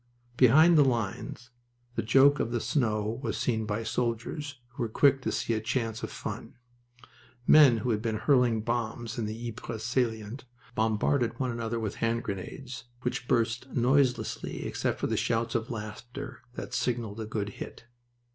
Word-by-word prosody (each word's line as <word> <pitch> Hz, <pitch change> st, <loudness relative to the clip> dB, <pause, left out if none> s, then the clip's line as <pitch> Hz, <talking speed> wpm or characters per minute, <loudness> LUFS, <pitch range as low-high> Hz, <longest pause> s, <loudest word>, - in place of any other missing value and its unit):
Behind 155 Hz, +7 st, +7 dB
the -, -, +8 dB
lines 120 Hz, 0 st, -2 dB, 0.4 s
the 115 Hz, -, -1 dB
joke 135 Hz, +6 st, +5 dB
of 115 Hz, -, 0 dB
the 120 Hz, 0 st, -1 dB
snow 110 Hz, -3 st, 0 dB
was -, -, -2 dB
seen 110 Hz, -3 st, 0 dB
by 105 Hz, +2 st, -1 dB
soldiers, 125 Hz, +5 st, -2 dB
who 120 Hz, -, -8 dB
were 115 Hz, -, 0 dB
quick 135 Hz, +4 st, +4 dB
to -, -, -1 dB
see 115 Hz, -, -1 dB
a 110 Hz, -, -1 dB
chance 115 Hz, 0 st, -2 dB
of 110 Hz, -, -4 dB
fun. -, -, -6 dB, 0.9 s
Men 140 Hz, -6 st, +8 dB
who 120 Hz, +3 st, -1 dB
had 105 Hz, -1 st, 0 dB
been 110 Hz, -1 st, -1 dB
hurling 120 Hz, -1 st, +3 dB
bombs 120 Hz, 0 st, -2 dB
in 110 Hz, -, -1 dB
the 115 Hz, +3 st, -5 dB
Ypres 115 Hz, -1 st, -6 dB
salient 115 Hz, 0 st, -1 dB, 0.3 s
bombarded 115 Hz, +2 st, +1 dB
one 130 Hz, -2 st, 0 dB
another 115 Hz, 0 st, -2 dB
with 110 Hz, -3 st, -3 dB
hand 115 Hz, +1 st, 0 dB
grenades, 120 Hz, +5 st, -6 dB, 0.2 s
which 125 Hz, 0 st, -2 dB
burst 115 Hz, +2 st, +1 dB
noiselessly 130 Hz, +1 st, +1 dB
except -, -, -1 dB
for -, -, -1 dB
the 110 Hz, -, 0 dB
shouts 115 Hz, +1 st, 0 dB
of 115 Hz, 0 st, -1 dB
laughter 120 Hz, +4 st, -7 dB
that 125 Hz, -, -6 dB
signaled 115 Hz, -4 st, -1 dB
a 110 Hz, -, -4 dB
good 105 Hz, -2 st, -2 dB
hit. -, -, -7 dB
115 Hz, 165 wpm, -29 LUFS, 110-125 Hz, 0.9 s, the